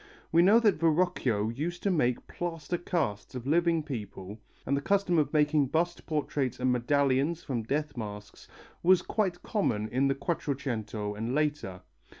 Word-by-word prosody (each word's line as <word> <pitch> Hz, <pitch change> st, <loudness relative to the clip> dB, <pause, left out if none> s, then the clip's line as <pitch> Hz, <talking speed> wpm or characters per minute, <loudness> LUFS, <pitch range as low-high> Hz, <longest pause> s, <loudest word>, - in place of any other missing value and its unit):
We 165 Hz, -, +5 dB
know 200 Hz, +6 st, +6 dB
that 210 Hz, -9 st, +2 dB
Verrocchio 155 Hz, -, +1 dB
used 160 Hz, +9 st, -4 dB
to 200 Hz, -, +2 dB
make 125 Hz, -8 st, +1 dB
plaster 170 Hz, -1 st, -4 dB
casts 130 Hz, -, -2 dB
of 125 Hz, -1 st, -6 dB
living 165 Hz, +2 st, +2 dB
people, 105 Hz, -, -7 dB, 0.3 s
and 140 Hz, -, +1 dB
the 140 Hz, -, -1 dB
custom 190 Hz, 0 st, +2 dB
of 145 Hz, -2 st, +1 dB
making 150 Hz, -2 st, +3 dB
bust 170 Hz, +5 st, -1 dB
portraits 145 Hz, -5 st, -1 dB
and 125 Hz, 0 st, +2 dB
medallions 140 Hz, +5 st, +1 dB
from 125 Hz, -4 st, -2 dB
death 145 Hz, +6 st, -2 dB
masks 105 Hz, -3 st, -8 dB, 0.3 s
was 185 Hz, +1 st, +5 dB
quite 190 Hz, -5 st, -1 dB
common 110 Hz, -, 0 dB
in 130 Hz, +2 st, +1 dB
the 135 Hz, -, +1 dB
Quattrocento 125 Hz, -, -3 dB
and 115 Hz, +5 st, -3 dB
later. 145 Hz, -12 st, -1 dB
145 Hz, 155 wpm, -29 LUFS, 120-170 Hz, 0.3 s, know